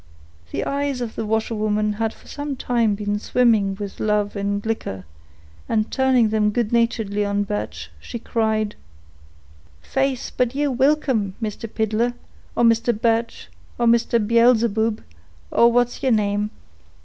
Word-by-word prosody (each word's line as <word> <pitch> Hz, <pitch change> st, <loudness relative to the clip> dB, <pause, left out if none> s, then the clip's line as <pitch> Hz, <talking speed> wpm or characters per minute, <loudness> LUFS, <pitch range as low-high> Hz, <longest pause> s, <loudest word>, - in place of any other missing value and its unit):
The -, -, -3 dB
eyes 280 Hz, -2 st, -1 dB
of 240 Hz, -3 st, -4 dB
the 220 Hz, -, -4 dB
washerwoman 215 Hz, -1 st, 0 dB
had 220 Hz, +1 st, -1 dB
for -, -, -19 dB
some 290 Hz, -1 st, -4 dB
time 235 Hz, -5 st, +1 dB
been 205 Hz, 0 st, -2 dB
swimming 220 Hz, -5 st, +2 dB
with 200 Hz, -1 st, -7 dB
love 210 Hz, -1 st, 0 dB
and 200 Hz, +1 st, -2 dB
liquor, 160 Hz, -, -3 dB, 0.6 s
and 215 Hz, -1 st, 0 dB
turning 260 Hz, -4 st, +3 dB
them 210 Hz, -1 st, +2 dB
good 220 Hz, 0 st, -1 dB
naturedly 225 Hz, -3 st, +1 dB
on 200 Hz, 0 st, 0 dB
Birch, 105 Hz, -, -5 dB
she 235 Hz, -, -7 dB
cried,— 220 Hz, -2 st, -1 dB, 1.0 s
"Faith, 270 Hz, -, -1 dB
but 250 Hz, 0 st, +1 dB
ye're 290 Hz, 0 st, +1 dB
wilcome, 260 Hz, -7 st, +1 dB
Mister 220 Hz, 0 st, -4 dB
Piddler, 220 Hz, +3 st, 0 dB, 0.4 s
or -, -, +2 dB
Mister 230 Hz, +1 st, +3 dB
Birch, 230 Hz, -, -1 dB, 0.3 s
or 240 Hz, -, +1 dB
Mister 235 Hz, 0 st, +3 dB
Beelzeboob, 230 Hz, -1 st, +3 dB, 0.5 s
or 235 Hz, 0 st, +5 dB
what's 245 Hz, 0 st, +1 dB
yeer 265 Hz, -2 st, +2 dB
name. 205 Hz, -1 st, +1 dB
225 Hz, 140 wpm, -22 LUFS, 210-240 Hz, 1.0 s, or